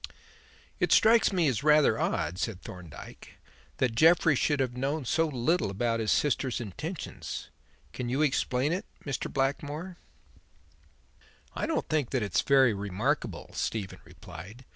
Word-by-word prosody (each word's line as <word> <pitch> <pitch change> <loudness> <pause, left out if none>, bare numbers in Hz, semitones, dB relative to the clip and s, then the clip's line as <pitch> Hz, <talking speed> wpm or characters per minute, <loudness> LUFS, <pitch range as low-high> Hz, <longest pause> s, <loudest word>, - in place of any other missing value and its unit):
"It - - +1
strikes 225 0 +5
me 175 -5 +2
as 125 -6 0
rather 150 0 +4
odd," 90 - -1
said 110 -6 -2
Thorndyke, 85 -6 -11 0.4
"that 125 -3 +1
Jeffrey 160 +4 +5
should 145 +2 +1
have 125 -2 -1
known 140 +3 -2
so 165 +6 +2
little 150 - 0
about 115 +4 -1
his 110 -1 0
sister's 135 -3 +1
intentions. 150 - -6 0.4
Can 125 -2 -4
you 135 +5 +1
explain 135 0 +1
it, 190 +4 -4 0.2
Mr. 135 -4 -3
Blackmore?" 145 +6 -2 1.6
"I - - -2
don't 325 - -1
think 150 -6 0
that 130 -4 0
it 100 - -5
is - - +4
very 135 -4 +4
remarkable," 105 - -2
Stephen 105 -4 -3
replied. 115 +7 -12
135 Hz, 140 wpm, -29 LUFS, 115-155 Hz, 1.6 s, strikes